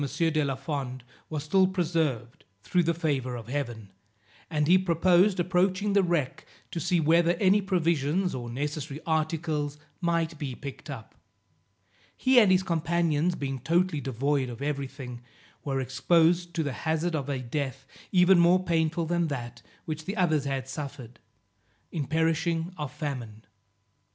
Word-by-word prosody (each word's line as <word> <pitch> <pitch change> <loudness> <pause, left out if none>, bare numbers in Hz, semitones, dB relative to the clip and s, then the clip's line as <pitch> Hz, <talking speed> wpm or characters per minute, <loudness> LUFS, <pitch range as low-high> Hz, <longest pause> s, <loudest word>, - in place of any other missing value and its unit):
de 160 -2 +2
la 135 -2 -1
Fond 135 -2 -4 0.3
was 155 -2 -3
still 190 +5 +4
preserved, 160 - -1 0.2
through 180 - +2
the 170 0 +1
favour 140 -7 -1
of 115 -2 -8
Heaven, 120 -7 -4 0.6
and 150 -2 +1
he 185 +3 +6
proposed 185 +2 +3
approaching 185 +3 +1
the 200 - +5
wreck, 170 -7 -1 0.3
to 170 - -3
see 175 +3 +1
whether 165 +2 +4
any 195 +3 +3
provisions 175 -2 +1
or 120 -2 -5
necessary 145 +3 -4
articles 155 -2 -1 0.2
might 165 -2 0
be 135 -4 -4
picked 140 +2 -9
up. 125 -6 -8 1.0
He 260 -1 +5
and 210 -5 +5
his 185 0 +4
companions 170 -1 +1
being 135 -3 -3
totally 165 +3 +1
devoid 135 +1 0
of 120 -1 -8
every 140 -2 -2
thing, 125 -3 -9 0.4
were 135 -2 -1
exposed 170 +6 +2
to 160 - +1
the 140 -3 -3
hazard 160 +3 -1
of 145 -3 -2
a 140 - -1
death 135 +1 -4 0.3
even 185 -1 +6
more 175 +2 +5
painful 165 -1 0
than 170 0 0
that 120 -4 -5 0.2
which 155 0 -5
the 200 +3 -4
others 155 -6 +2
had 135 -2 -2
suffered, 135 -4 -7 0.7
in 150 -6 -3
perishing 165 +2 0
of 150 -5 -5
famine. 120 -9 -6
155 Hz, 150 wpm, -28 LUFS, 135-175 Hz, 1.0 s, he